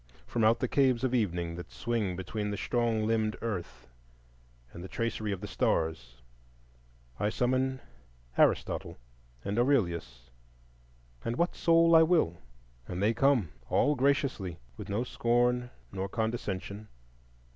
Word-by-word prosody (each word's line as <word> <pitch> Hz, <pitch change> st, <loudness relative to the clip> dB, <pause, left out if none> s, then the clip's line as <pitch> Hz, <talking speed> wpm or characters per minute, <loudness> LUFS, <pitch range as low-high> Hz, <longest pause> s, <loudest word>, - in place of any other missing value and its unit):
From 115 Hz, -, -1 dB
out 110 Hz, +2 st, +5 dB
the 130 Hz, -, +1 dB
caves 130 Hz, -2 st, +2 dB
of 130 Hz, -1 st, +1 dB
evening 90 Hz, -8 st, 0 dB
that 90 Hz, -, -8 dB
swing 110 Hz, -6 st, -1 dB
between 105 Hz, +3 st, -3 dB
the 100 Hz, -, -3 dB
strong 115 Hz, -2 st, 0 dB
limbed 110 Hz, -1 st, +1 dB
earth 90 Hz, -, -5 dB, 0.9 s
and 85 Hz, -, -8 dB
the -, -, -6 dB
tracery 115 Hz, -2 st, -2 dB
of 95 Hz, -2 st, -3 dB
the 105 Hz, -, -5 dB
stars, 65 Hz, -11 st, -1 dB, 1.0 s
I 105 Hz, -, +1 dB
summon 130 Hz, +3 st, 0 dB, 0.5 s
Aristotle -, -, +1 dB, 0.5 s
and 105 Hz, +3 st, -1 dB
Aurelius 85 Hz, -, 0 dB, 0.9 s
and 115 Hz, -, -2 dB
what 170 Hz, +6 st, 0 dB
soul 165 Hz, 0 st, +5 dB
I 160 Hz, -, +9 dB
will, 160 Hz, -, +3 dB, 0.5 s
and 90 Hz, -, -4 dB
they 105 Hz, +4 st, +3 dB
come 125 Hz, -, +3 dB, 0.2 s
all 150 Hz, -, +3 dB
graciously 135 Hz, -, 0 dB, 0.2 s
with -, -, -8 dB
no 105 Hz, +4 st, 0 dB
scorn 125 Hz, 0 st, +1 dB, 0.2 s
nor 95 Hz, 0 st, -3 dB
condescension. 105 Hz, -2 st, -3 dB
110 Hz, 135 wpm, -30 LUFS, 95-125 Hz, 1.0 s, I